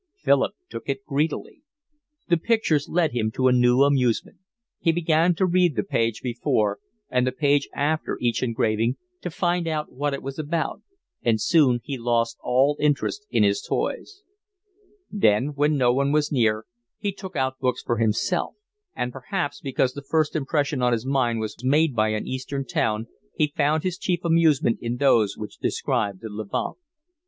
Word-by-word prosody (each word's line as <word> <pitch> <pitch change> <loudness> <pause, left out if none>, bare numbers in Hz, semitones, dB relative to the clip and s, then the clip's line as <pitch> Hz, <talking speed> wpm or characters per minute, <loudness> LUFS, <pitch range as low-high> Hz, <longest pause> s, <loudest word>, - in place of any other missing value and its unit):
Philip - - +2
took - - -8
it 135 0 -3
greedily. 150 - -2 0.7
The 170 - +3
pictures 165 - +1
led 165 -2 +2
him 115 -2 0
to 130 - +2
a - - +5
new 125 +1 +4
amusement. 130 -5 +1 0.4
He 165 - +2
began 165 +1 +2
to 190 - +2
read 180 -4 +2
the - - 0
page 115 - -1
before 120 -4 0 0.3
and 125 0 +2
the - - +1
page 140 +1 +1
after 155 +2 -1
each 120 -1 0
engraving 115 0 0 0.3
to 180 - -4
find 175 0 0
out 155 -2 -2
what 145 +2 -2
it - - -9
was 135 +2 -6
about, 155 +1 -2 0.4
and 115 -2 +2
soon 130 -2 +3
he 135 0 -5
lost 115 -1 0
all 135 +4 +2
interest 150 +8 0
in 115 -3 +2
his 100 0 +2
toys. 410 0 -3 0.9
Then, 125 - +2
when 145 +1 +2
no 125 -2 +3
one 140 +2 +1
was 150 0 +1
near, 110 -5 +1 0.3
he 205 - -2
took 190 -2 -10
out 130 -1 -1
books 125 -1 -1
for 120 - -1
himself; 110 -1 0 0.4
and 125 - -2
perhaps 145 +4 -4
because 130 -2 0
the 145 - -7
first 155 +2 0
impression 145 -2 0
on 125 -1 +3
his 115 +1 -2
mind 130 -4 +1
was 110 +2 -6
made 145 +1 +3
by 110 -1 +2
an 110 0 -2
Eastern 135 +1 -4
town, 110 -3 -1 0.3
he 150 -1 0
found 150 +2 +1
his 185 -1 -2
chief 175 -2 -1
amusement 160 -7 +3
in 120 0 -2
those 115 -7 +3
which 105 -1 -8
described 100 -2 -1
the 110 - -5
Levant. 105 - -4
135 Hz, 175 wpm, -24 LUFS, 120-155 Hz, 0.9 s, a